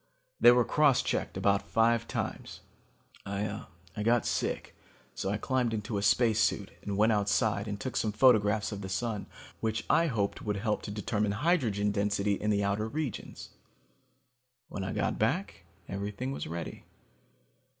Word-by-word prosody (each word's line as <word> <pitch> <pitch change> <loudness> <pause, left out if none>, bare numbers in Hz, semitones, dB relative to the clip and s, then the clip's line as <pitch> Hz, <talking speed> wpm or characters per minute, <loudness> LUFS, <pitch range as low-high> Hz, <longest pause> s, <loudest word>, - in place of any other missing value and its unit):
They 120 - +8
were 120 -1 +4
cross 150 -4 +3
checked - - -2
about 100 0 +2
five 115 +1 +2
times. - - -4 0.6
I 100 +1 -3 0.5
got 115 +1 +2
sick - - -2 0.4
so 95 - -3
I 105 - 0
climbed 125 0 0
into 105 -1 -3
a - - -3
spacesuit 105 -1 +2
and 100 -1 -4
went 110 +2 +4
outside 105 0 +1
and 100 -1 -4
took 130 +4 -5
some 110 - +1
photographs 105 -3 +4
of 100 -1 -5
the 95 - -6
Sun 105 +2 -2 0.3
which 110 -1 -2
I 165 +1 +4
hoped 105 -8 -1
would 105 -2 -2
help 105 +1 -1
to - - -7
determine 105 0 -1
hydrogen 110 - +1
density 100 0 0
in 105 +2 -2
the 100 -1 +2
outer 100 +2 0
regions. 145 -1 -5 1.2
When 95 - -5
I 95 - -3
got - - -1
back - - -1 0.2
everything 100 +6 -4
was 135 - -4
ready. 85 +1 -6
105 Hz, 155 wpm, -30 LUFS, 100-115 Hz, 1.2 s, They